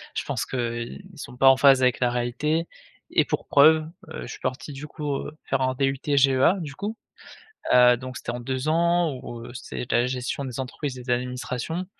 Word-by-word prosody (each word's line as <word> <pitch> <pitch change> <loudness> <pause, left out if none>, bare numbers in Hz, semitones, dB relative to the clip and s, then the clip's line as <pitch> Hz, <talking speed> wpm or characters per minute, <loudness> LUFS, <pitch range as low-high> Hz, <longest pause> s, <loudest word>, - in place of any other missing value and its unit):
je - - -1
pense - - -2
qu'ils 120 - -4
sont 125 -4 -9
pas 135 - +5
en 135 0 +8
phase 135 -1 +6
avec 125 -1 +3
la 125 - +2
réalité 135 +7 -1 0.4
et - - +4
pour - - -3
preuve, 155 +2 +5 0.2
heu, - - -7
je - - -8
suis - - -8
parti 130 +3 -4
du 145 +3 -7
coup, 150 -2 -3
heu, 155 - -7
faire 135 0 0
un 130 0 +1
DUT 135 0 0 0.2
GEA, 135 +6 +4
du 150 -5 -6
coup. 215 +6 -4 0.8
Heu, 125 -1 +7
donc, 130 +1 -8
c'était - - -5
en 120 - -4
2 130 +3 -3
ans 170 -1 +2
où, 120 -1 -7
heu, - - -10
c'est 125 0 -7
la 120 +1 +3
gestion 125 +2 -3
des 130 0 -5
entreprises 130 +1 -5
et - - -8
des 125 - -1
administrations. 125 +7 -3
130 Hz, 210 wpm, -25 LUFS, 125-150 Hz, 0.8 s, en